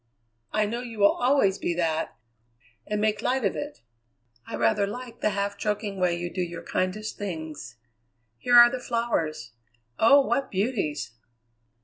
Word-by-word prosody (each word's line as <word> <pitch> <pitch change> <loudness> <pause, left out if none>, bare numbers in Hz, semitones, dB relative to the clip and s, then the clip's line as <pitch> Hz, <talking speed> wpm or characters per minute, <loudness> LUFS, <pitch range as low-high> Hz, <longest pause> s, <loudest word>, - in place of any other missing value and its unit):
I 215 0 +2
know 235 +4 -3
you 235 -3 -8
will 200 -1 +6
always 245 -7 +2
be 170 - -1
that, 165 -2 -1 0.7
and 210 0 -1
make 215 0 +1
light 255 -1 0
of 195 - 0
it. 145 -5 -6 0.6
I - - -5
rather 115 - +2
like 245 +3 -8
the - - +2
half 200 0 -2
joking 210 -2 -2
way 180 -2 +2
you 175 0 -5
do 185 - -2
your 175 -1 -5
kindest 210 +4 -2
things. 160 - -6 0.6
Here 245 -1 +4
are 240 0 +9
the 255 - -3
flowers! 225 - -2 0.5
Oh, 280 +5 +7
what 275 - 0
beauties!" 190 - -2
205 Hz, 155 wpm, -26 LUFS, 175-235 Hz, 0.7 s, are